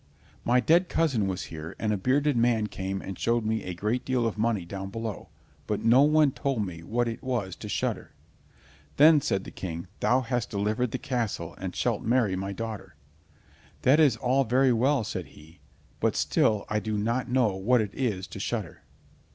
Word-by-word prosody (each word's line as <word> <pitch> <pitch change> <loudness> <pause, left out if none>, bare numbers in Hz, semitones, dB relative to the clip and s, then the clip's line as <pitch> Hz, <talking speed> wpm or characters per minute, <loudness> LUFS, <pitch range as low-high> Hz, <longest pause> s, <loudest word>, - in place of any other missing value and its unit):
My 125 +2 +3
dead 170 +8 +3
cousin 135 -11 +1
was 95 -1 -3
here, 80 +2 -7
and 110 -1 0
a - - +1
bearded 135 +8 +1
man 115 -2 +2
came 95 -1 -4
and 95 - -7
showed 115 -1 +1
me 110 0 0
a 90 - -5
great 105 +7 -1
deal 130 -2 0
of 115 - -1
money 110 -4 0
down 95 +2 -6
below, 115 0 -5 0.4
but - - -2
no 120 +4 +6
one 150 0 +4
told 130 -6 -1
me 85 -3 -7
what 120 +7 -1
it 115 0 -4
was 115 -8 -2
to - - -8
shudder." - - -2 0.9
"Then," 150 +1 +7
said 95 -7 -1
the - - -9
King, 85 -2 -6
"thou 125 +2 +3
hast 120 -1 -2
delivered 110 +4 -1
the - - -3
castle, 120 -5 -3
and - - -5
shalt - - 0
marry 115 -5 +2
my 95 +1 -3
daughter." 100 -4 -6 0.9
"That 140 +5 +5
is 140 -8 +4
all 130 +4 +2
very 130 +2 +3
well," 130 +2 +2
said - - -5
he, 80 +3 -16 0.4
"but - - +1
still 105 -2 +1
I 105 - 0
do 110 0 -3
not 120 +4 -1
know 120 -6 +2
what 115 +6 +2
it 105 -3 -2
is 105 -8 -2
to - - -8
shudder!" - - -4
115 Hz, 190 wpm, -27 LUFS, 100-125 Hz, 0.9 s, Then